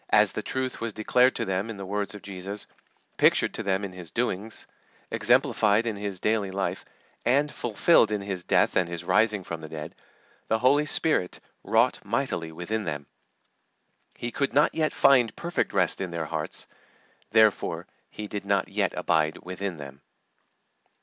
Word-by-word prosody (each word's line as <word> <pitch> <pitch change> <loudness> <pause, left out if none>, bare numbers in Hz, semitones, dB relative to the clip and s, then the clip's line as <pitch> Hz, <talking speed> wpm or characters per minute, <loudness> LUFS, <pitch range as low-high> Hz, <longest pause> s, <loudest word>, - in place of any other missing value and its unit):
As - - +5
the - - -4
truth 130 -1 -3
was 115 -1 -2
declared 125 +5 +3
to - - -2
them 95 +3 -2
in 110 - -6
the 100 - -6
words 100 +1 -2
of 105 - -11
Jesus, 100 +1 -6 0.5
pictured - - +3
to - - -4
them 95 0 0
in 95 - -8
His 90 -3 -7
doings, 110 -1 -3 0.5
exemplified 115 -1 +3
in 115 -2 -1
His 100 -2 -4
daily 105 -1 +1
life, 95 -1 -3 0.4
and 140 +4 +2
fulfilled 120 +3 +3
in 105 -1 -1
His 95 -3 -3
death - - +2
and 90 -2 +2
His 85 0 -4
rising 105 +1 +2
from 85 -2 -6
the 80 - -8
dead, 80 +1 -7 0.5
the 110 - +2
Holy 140 +6 +3
Spirit 150 - +1 0.2
wrought 115 +3 +2
mightily 105 -7 -2
within 90 +7 -3
them; 75 -4 -4 1.1
but - - -25
He 120 - -3
could 140 +4 -1
not 150 - +4
yet 155 -1 +1
find 120 -5 +4
perfect 170 +1 -2
rest 90 -2 +2
in 95 - -2
their 85 -2 -3
hearts; - - -4 0.6
therefore 110 -1 +3 0.2
He 105 - -7
did 105 -1 -5
not 100 -1 0
yet - - 0
abide 80 -2 +1
within 90 0 -4
them. 70 -1 -10
100 Hz, 170 wpm, -26 LUFS, 90-115 Hz, 1.1 s, As